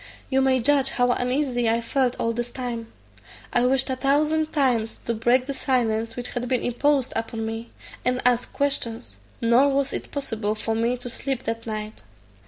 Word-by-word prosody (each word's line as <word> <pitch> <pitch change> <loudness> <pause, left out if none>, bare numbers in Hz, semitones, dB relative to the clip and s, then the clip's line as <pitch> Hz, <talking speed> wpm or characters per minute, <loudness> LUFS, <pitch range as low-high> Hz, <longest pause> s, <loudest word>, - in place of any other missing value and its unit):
You 265 0 +3
may 265 -1 +3
judge 275 +1 +3
how 245 -2 +2
uneasy 250 -1 0
I 230 +1 +2
felt 250 +2 0
all 230 - 0
this 240 +1 -3
time. 240 -2 -5 0.6
I 245 +1 +3
wished 265 +1 +2
a 260 - -1
thousand 305 +4 +1
times 245 -6 +1
to 235 - 0
break 240 +3 +2
the 280 - -3
silence 230 -4 0
which 245 -1 -4
had 245 0 -3
been 255 - +1
imposed 270 +2 +1
upon 225 0 -3
me, 225 +1 -5 0.3
and 250 0 +1
ask 245 -1 +2
questions; 250 -5 -1 0.2
nor 240 +4 +5
was 275 0 0
it - - -5
possible 225 -7 -2
for 225 +1 -1
me 230 +3 +1
to 245 - -7
sleep 260 +1 -3
that 230 +1 -4
night. 215 - -5
245 Hz, 185 wpm, -24 LUFS, 230-270 Hz, 0.6 s, nor